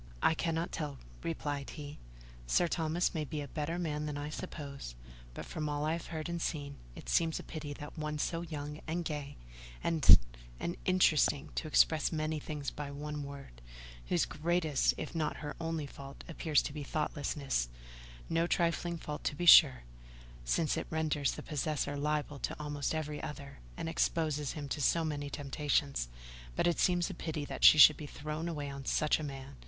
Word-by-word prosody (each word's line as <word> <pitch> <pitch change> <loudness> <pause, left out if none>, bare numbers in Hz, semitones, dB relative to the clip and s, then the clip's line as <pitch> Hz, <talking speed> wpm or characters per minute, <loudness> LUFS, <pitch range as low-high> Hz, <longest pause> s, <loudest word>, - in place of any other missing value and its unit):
"I - - +5
cannot 165 +1 -1
tell," 145 -3 -4 0.2
replied 145 -4 -3
he. 145 -1 -8 0.5
"Sir 175 - +3
Thomas 165 +1 0
may 160 -3 -1
be 150 +1 -4
a 145 - -4
better 155 +4 -3
man 150 -3 -2
than 145 -1 -3
I 145 +1 -4
suppose; 140 - -6 0.4
but, - - -6
from 155 -1 -3
all 145 0 -1
I 155 - +1
have 170 - -4
heard 160 -2 -4
and 170 -1 -3
seen, 145 -4 -3 0.2
it - - -10
seems 165 -1 +2
a - - -6
pity 155 -2 -6
that 145 +3 -9
one 150 0 -2
so 165 +3 -1
young 150 -2 -6
and 170 +2 -2
gay, 145 -3 -4 0.5
and—and - - +4
interesting, 155 -6 +3
to 160 - -3
express 155 +1 +4
many 155 -1 -1
things 145 -2 -4
by 145 -1 -5
one 150 +1 -5
word—whose - - -5
greatest, 160 -2 +1
if 155 - -5
not 155 -3 -1
her 145 0 -6
only 165 -2 -2
fault, 140 0 -10
appears 160 -3 +2
to - - -4
be 150 - -5
thoughtlessness—no - - -2
trifling 170 0 +1
fault 150 -2 -6
to 145 - 0
be 175 - -2
sure, 145 - +9 0.6
since 155 - +1
it - - -3
renders 155 -3 0
the - - -7
possessor 150 -1 -1
liable 150 0 -1
to - - -4
almost 145 0 -2
every 150 -1 -3
other, 140 -2 -7 0.2
and - - -3
exposes 155 -3 0
him 145 -2 -5
to 145 - -3
so 165 +3 +3
many 145 -2 -3
temptations—but - - -2
it 175 -1 +2
seems 175 -1 +2
a - - -5
pity 155 -3 -4
that - - -6
she - - +10
should 150 0 +10
be 150 - -7
thrown 155 +3 -4
away 145 -3 -3
on 140 -1 -6
such 150 +4 +2
a - - -4
man. 135 -1 -7
150 Hz, 180 wpm, -33 LUFS, 140-160 Hz, 0.6 s, she